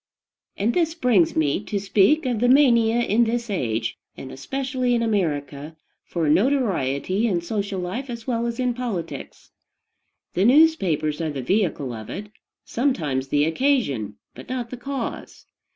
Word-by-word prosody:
And 220 +4 +1
this 330 -2 +1
brings 240 - +3
me 155 +5 +1
to 205 - -2
speak 200 - +3
of 245 -4 0
the 245 +2 +3
mania 240 -4 +5
in 235 +1 +3
this 235 0 -2
age, 115 - -2 0.2
and 130 - -8
especially 255 - -2
in 230 - +1
America, 150 -8 -2 0.3
for 165 -3 -2
notoriety 195 - +1
in 185 -6 +1
social 200 +1 -3
life 225 +10 -4
as 235 -2 -6
well 235 -2 -1
as 235 +1 -4
in 250 -1 +1
politics. 235 -8 -6 0.8
The 185 - +1
newspapers 195 - +3
are 160 - -1
the 140 -3 -5
vehicle 160 - 0
of 110 -2 -8
it, 210 0 -7 0.3
sometimes 155 - -1
the 145 +2 +2
occasion, 160 - 0 0.2
but - - -12
not 250 -2 -4
the 255 - -6
cause. 265 -1 -6
210 Hz, 150 wpm, -23 LUFS, 155-250 Hz, 0.8 s, mania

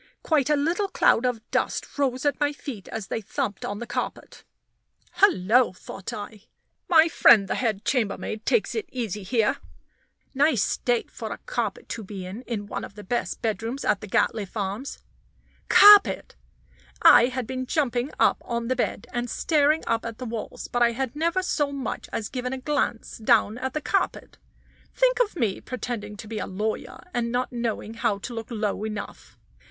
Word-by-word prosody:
Quite 300 -4 +2
a 300 - +4
little 335 +8 0
cloud 250 -9 +3
of 230 -3 -3
dust - - -2
rose 260 -1 0
at 290 - +1
my 290 0 +1
feet 255 -9 -8
as 220 -3 -5
they 225 - -3
thumped 220 -1 -3
on 205 - -3
the 235 - -5
carpet. - - -5 0.8
"Hullo!" 245 - +4
thought 185 +1 -8
I, 210 0 -8 0.4
"my 325 -2 +7
friend 220 -10 +6
the - - -1
head 220 -4 -1
chambermaid 220 -3 -1
takes 465 - +1
it 425 -6 -4
easy 220 -5 -3
here. 215 +3 +1 0.8
Nice 275 -5 +3
state 240 -2 -1
for - - -6
a - - -4
carpet - - -3
to 225 - -5
be 195 -2 -7
in, 195 +6 -7
in 215 -4 -3
one 205 - -5
of 200 - -9
the 210 - -9
best 240 +5 -3
bedrooms 225 +5 -2
at 205 - +2
the 210 - -7
Gatliffe 205 +1 0
Arms." 205 +7 -3 0.7
Carpet! 410 0 +7 0.7
I 240 - +8
had 255 -1 -3
been 255 +1 -4
jumping 255 -3 0
up - - +3
on 235 0 -3
the 255 - +2
bed, 250 - -2
and 240 0 -2
staring 305 +2 +2
up 230 0 0
at 230 -1 -6
the 255 - -6
walls, 225 -2 -6
but 245 - -2
I 235 0 +4
had 260 +1 -3
never 335 +4 0
so 295 -5 0
much 275 -2 -5
as 215 - -3
given 250 0 -4
a - - -3
glance 260 -5 -2
down 225 0 +3
at 260 +1 -4
the 305 - -1
carpet. 390 - -2 0.6
Think - - +3
of 455 -6 +1
me 225 - -1
pretending 225 -5 -5
to 215 - -9
be 220 0 -4
a - - -4
lawyer, 210 +3 -4
and 235 -1 -1
not 250 +1 -1
knowing 235 -2 -3
how 230 -3 0
to 240 +5 -7
look 225 -1 -5
low 215 -3 -2
enough! 215 -1 -7
240 Hz, 185 wpm, -25 LUFS, 215-280 Hz, 0.8 s, I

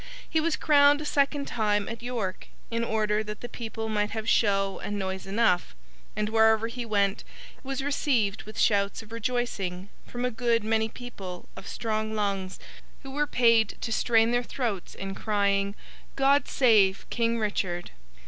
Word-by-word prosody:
He 320 - +1
was 330 0 +1
crowned 290 -1 +5
a 305 - -5
second 285 -1 +1
time 210 -4 0
at 230 0 -6
York, 235 -6 -4 0.2
in 230 0 0
order 215 -1 0
that 210 0 -7
the 240 - -5
people 225 -2 -5
might 210 -1 0
have 220 0 -5
show 195 -2 +2
and 205 - -4
noise 190 -1 -4
enough; 195 - +1 0.4
and 210 0 -1
wherever 220 0 +4
he 240 0 -5
went 200 -2 +1 0.4
was 270 0 -4
received 255 -8 +1
with 215 +1 -11
shouts 200 0 +2
of 220 - -17
rejoicing—from 230 -1 -3
a 250 - 0
good 230 -1 +1
many 220 0 +1
people 200 -8 -8
of - - -10
strong 220 -1 -2
lungs, 195 -3 -2 0.5
who 270 - -8
were 295 +2 0
paid 230 -5 +3
to 230 - -3
strain 225 0 +3
their 245 0 +2
throats 235 -6 -4
in 195 0 -5
crying, 200 -1 0 0.4
'God 275 +1 +3
save 210 -7 +3
King 230 -1 +1
Richard! 190 -5 -2
220 Hz, 160 wpm, -27 LUFS, 200-245 Hz, 0.5 s, crowned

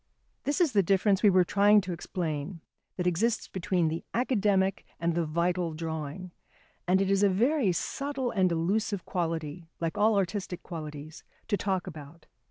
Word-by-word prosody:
This 290 +6 0
is 340 -6 +3
the 205 -4 +4
difference 195 +1 +2
we 210 - +6
were 185 -1 +5
trying 205 +3 +5
to 185 -2 -4
explain 165 -1 -4 0.4
that 180 - -2
exists 215 +6 +1
between 180 -2 0
the 160 +1 -3
academic 205 -6 +1 0.2
and 170 0 0
the 170 -1 0
vital 170 +1 0
drawing, 160 +2 -5 0.6
and 185 +1 +4
it 195 0 +1
is 195 0 +3
a 205 - +5
very 235 +3 +2
subtle 270 - -2
and 185 -4 +2
elusive 195 +4 0
quality, 165 -1 -3
like 165 +2 -2
all 215 +1 +4
artistic 190 -1 -2
qualities, 155 -2 -8 0.3
to 210 - +3
talk 190 -3 -1
about. 155 +2 -10
185 Hz, 165 wpm, -29 LUFS, 165-205 Hz, 0.6 s, we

